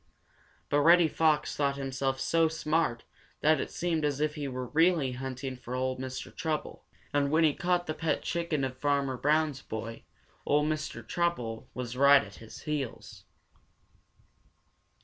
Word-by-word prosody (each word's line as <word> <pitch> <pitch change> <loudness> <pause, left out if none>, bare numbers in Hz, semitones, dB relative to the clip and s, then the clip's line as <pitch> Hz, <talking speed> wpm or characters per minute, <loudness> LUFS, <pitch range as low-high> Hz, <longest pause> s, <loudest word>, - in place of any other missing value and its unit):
But 145 - +3
Reddy 170 +3 +6
Fox 155 -1 +1
thought 140 -1 0
himself 135 -1 -2
so 165 +4 +3
smart 155 -6 0 0.4
that 155 +1 +4
it - - -4
seemed 165 -3 -1
as 145 -2 0
if 150 0 +1
he 150 -2 -4
really 135 +3 +1
were 125 - -7
hunting 130 0 -4
for 125 0 -7
Ol' 130 0 -1
Mr. 130 0 -6
Trouble. 155 -1 -3 0.3
And 145 -1 +2
when 160 +3 +3
he 155 -2 +4
caught 175 +1 0
the 155 - -2
pet 160 0 -1
chicken 170 -4 -1
of 130 -1 -2
Farmer 140 -1 0
Brown's 150 0 +1
boy, 115 +1 -6 0.4
Ol' 150 +1 +2
Mr. 150 -7 -3
Trouble 125 -9 -2
was 125 -1 -4
right 140 +1 +6
at - - -11
his 110 -1 -11
heels. 145 -5 -5
145 Hz, 155 wpm, -29 LUFS, 130-155 Hz, 0.4 s, Reddy